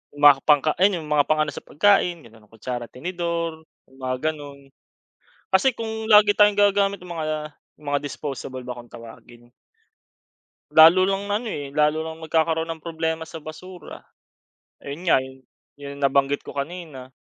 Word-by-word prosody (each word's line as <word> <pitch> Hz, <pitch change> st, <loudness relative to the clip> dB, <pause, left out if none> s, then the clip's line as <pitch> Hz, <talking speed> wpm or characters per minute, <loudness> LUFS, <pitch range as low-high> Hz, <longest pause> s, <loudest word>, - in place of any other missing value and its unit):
mga 145 Hz, -1 st, +7 dB
pangka 150 Hz, 0 st, +4 dB
ayun 190 Hz, -2 st, +3 dB
yung 150 Hz, -, -10 dB
mga -, -, -9 dB
yung -, -, +3 dB
mga 145 Hz, -, +4 dB
pang-ano 155 Hz, -1 st, +1 dB
sa -, -, -9 dB
pagkain 180 Hz, +1 st, +3 dB
ganun 110 Hz, -2 st, -18 dB
kutsara 120 Hz, +2 st, -6 dB
tinidor 170 Hz, +1 st, -4 dB, 0.2 s
yung 130 Hz, -, -21 dB
mga 130 Hz, 0 st, -2 dB, 0.2 s
ganun. 140 Hz, -2 st, -12 dB, 0.8 s
Kasi 190 Hz, +8 st, +4 dB
kung 220 Hz, -1 st, -5 dB
lagi 210 Hz, -1 st, +7 dB
tayong 210 Hz, -1 st, +5 dB
gagagamit 200 Hz, -1 st, +3 dB
nung 175 Hz, -, -8 dB
mga, 155 Hz, -1 st, -3 dB, 0.3 s
mga 145 Hz, -1 st, -1 dB
disposable 135 Hz, -3 st, -6 dB
ba 125 Hz, -1 st, -6 dB
kong 120 Hz, -, -16 dB
tawagin. 120 Hz, +1 st, -14 dB, 1.2 s
Lalo 165 Hz, +4 st, +7 dB
lang 195 Hz, +1 st, -1 dB
ano 210 Hz, +4 st, -2 dB
eh, 140 Hz, -1 st, -6 dB
lalo 150 Hz, +1 st, +2 dB
lang 160 Hz, 0 st, -9 dB
nagkakaroon 160 Hz, +1 st, 0 dB
ng 160 Hz, -1 st, -9 dB
problema 160 Hz, -1 st, -3 dB
sa 160 Hz, -2 st, -10 dB
basura. 175 Hz, +4 st, -10 dB, 0.8 s
Ayun 140 Hz, +4 st, -8 dB
nga -, -, +6 dB
yu 130 Hz, 0 st, -10 dB, 0.3 s
yun 140 Hz, 0 st, -9 dB
nabanggit 140 Hz, 0 st, +1 dB
ko -, -, -8 dB
kanina, 140 Hz, -3 st, -7 dB
155 Hz, 160 wpm, -23 LUFS, 140-175 Hz, 1.2 s, mga